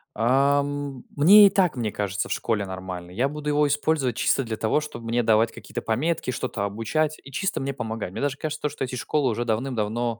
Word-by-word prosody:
Ам, 140 +3 +1
мне 200 +8 +8
и - - +4
так, 180 -7 +2
мне 115 -4 -2
кажется, 100 -1 -3
в - - -6
школе 110 -3 -1
нормально. 95 -2 -7
Я 120 +8 0
буду 150 0 -4
его 150 0 +3
использовать 145 -4 0
чисто 135 - +2
для 110 -2 -4
того, 110 +8 +1
чтоб 150 -6 -8
мне 115 +1 0
давать 110 +1 +3
какие-то - - -7
пометки, 130 +4 -1
что-то 120 -4 -3
обучать 115 +10 -1
и 140 - -12
чисто 195 +8 -1
мне 135 0 -2
помогать. 110 -6 -4
Мне - - -6
даже 145 -1 -1
кажется, 155 -1 -3
что 140 - -5
эти 125 0 -4
школы 135 +2 0
уже 120 +2 -2
давным-давно, 115 -1 -1
125 Hz, 205 wpm, -25 LUFS, 110-145 Hz, -, мне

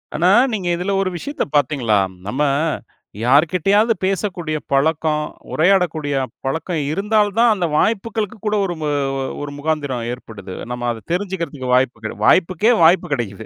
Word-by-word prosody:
ஆனா, 175 +3 +3 0.2
நீங்க 190 -5 -2
இதுல 180 +3 -2
ஒரு 190 - 0
விஷயத்த 285 - -3
பார்த்தீங்களா? 130 -7 +2 0.3
நம்ம 130 +7 -2 0.8
யார்க்கிட்டயாது 185 - +3
பேசக்கூடிய 185 -5 -1
பழக்கம். 150 +2 +1 0.3
உரையாடக்கூடிய 165 -4 +2 0.3
பழக்கம் 160 +5 -2
இருந்தால் 210 +4 +2
தான், 235 0 +6
அந்த 180 -3 -1
வாய்ப்புகளுக்கு 220 +1 -1
கூட, 210 0 +1
ஒரு 175 -2 -3
மு 150 - -1 0.5
ஒரு 145 -1 -5
முகாந்திரம் 145 -4 -2
ஏற்படுது. 105 -6 -10 0.2
நம்ம 125 0 -3
அத 115 -2 -7
தெரிஞ்சுகிறதுக்கு 170 -8 -3
வாய்ப்புக் 120 -4 +1 0.2
வாய்ப்புக்கே 185 +5 +4
வாய்ப்பு 170 +3 +4
கெடைக்குது 110 -7 -4
160 Hz, 130 wpm, -19 LUFS, 135-195 Hz, 0.8 s, தான்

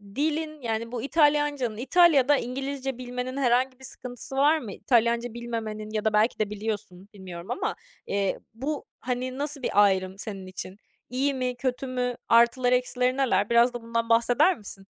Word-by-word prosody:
dilin, 310 0 -1
yani 230 0 -3
bu 240 -2 -3
İtalyancanın, 290 -6 +2
İtalya'da 285 0 +5
İngilizce 270 +1 -4
bilmenin 250 +1 -5
herhangi 255 0 +1
sıkıntısı 250 +1 -7
var 295 +4 +4
mı? 220 -7 -7
İtalyanca 235 -1 +1
bilmemenin 225 -3 -5
ya 215 0 -2
da 215 - +2
belki 215 +3 +2
de 210 -1 0
biliyorsun, 205 -2 -5
bilmiyorum 185 +1 -8
ama, 395 +8 -2 0.3
eee, 200 -1 0
bu, 280 +5 -4
hani, 255 +1 -3
nasıl 290 -1 -3
bir - - -2
ayrım 190 -1 +1
senin 195 -2 -6
için? 185 +1 -7 0.3
İyi 270 +3 0
mi, 250 -1 -2
kötü 255 +1 -2
mü? 250 -1 -1
Artıları, 240 +2 +4
eksileri 250 +1 0
neler? 210 -6 +2
Biraz 235 +1 +4
da 240 - -5
bundan 230 0 -2
bahseder 245 +10 +4
misin? 195 -2 -9
245 Hz, 160 wpm, -26 LUFS, 220-270 Hz, 0.3 s, İtalya'da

